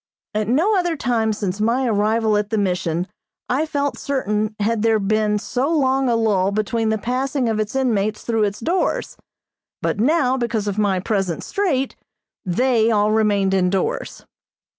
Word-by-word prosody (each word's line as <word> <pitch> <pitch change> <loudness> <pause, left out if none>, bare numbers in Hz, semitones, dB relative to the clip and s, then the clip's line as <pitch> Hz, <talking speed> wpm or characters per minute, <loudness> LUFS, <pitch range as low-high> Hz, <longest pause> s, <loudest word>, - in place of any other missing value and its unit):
At 215 0 -1
no 330 - +2
other 350 -3 +1
time 230 -4 0
since 205 -1 -3
my 240 +4 +1
arrival 220 0 +1
at 210 0 0
the 220 - -1
Mission 180 -3 0 0.4
I 285 +6 0
felt 285 -2 -2
certain 215 -6 -1
had 215 +1 0
there 225 0 +3
been 210 +1 +1
so 250 +6 -2
long 270 -4 +2
a 235 - +2
lull 200 -4 +2
between 220 +2 -1
the 220 - +1
passing 255 +4 -1
of 220 -1 0
its 215 +3 -3
inmates 215 -5 0
through 225 -2 +1
its 205 +1 -3
doors; 355 +9 -1 0.6
but - - -2
now, 265 +1 +2
because 235 -4 -2
of 205 +1 -2
my 200 -3 +2
present 190 -4 -2
strait, 295 -10 -1 0.5
they 230 +4 +2
all 210 -1 +2
remained 205 -3 +2
indoors. 190 0 -1
220 Hz, 160 wpm, -21 LUFS, 205-255 Hz, 0.6 s, there